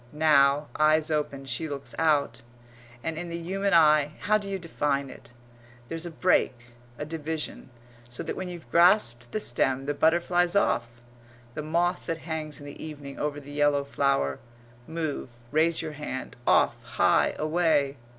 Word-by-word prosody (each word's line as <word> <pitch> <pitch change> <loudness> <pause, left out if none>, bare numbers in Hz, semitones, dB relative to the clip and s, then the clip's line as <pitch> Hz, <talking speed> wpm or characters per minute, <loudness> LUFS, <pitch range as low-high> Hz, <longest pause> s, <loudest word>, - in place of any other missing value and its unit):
Now, 145 -1 +4
eyes 155 +1 +3
open, 145 -3 -2
she 135 +5 -3
looks 140 -1 -6
out; 145 -7 +2 0.6
and 160 0 -3
in 175 0 -5
the 170 - -4
human 195 +4 -2
eye 150 -2 +5
how 215 +2 +3
d'you 200 -1 -4
define 145 -5 -2
it? - - -14 0.6
there's 165 +1 -4
a - - -5
break 125 -8 +1 0.3
a 150 - -4
division 155 -3 -5 0.4
so 120 - -4
that - - -4
when 185 -1 -5
you've 175 -2 -9
grasped 170 - +4
the 215 - -1
stem 135 -4 +1
the 145 - -1
butterfly's 175 +4 +2
off 120 -10 0 0.5
the 150 - -4
moth 170 +4 0
that 165 - -1
hangs 155 -2 -4
in 145 - -11
the 145 - -9
evening 145 -3 -8
over 145 0 -2
the 145 0 -11
yellow 145 -1 +2
flower 140 - 0 0.5
move, 160 -5 -3 0.2
raise 160 +2 +2
your 160 - -4
hand, 145 -3 -6
off, - - +3
high, - - +2
away. 155 -3 +1
155 Hz, 160 wpm, -27 LUFS, 140-165 Hz, 0.6 s, eye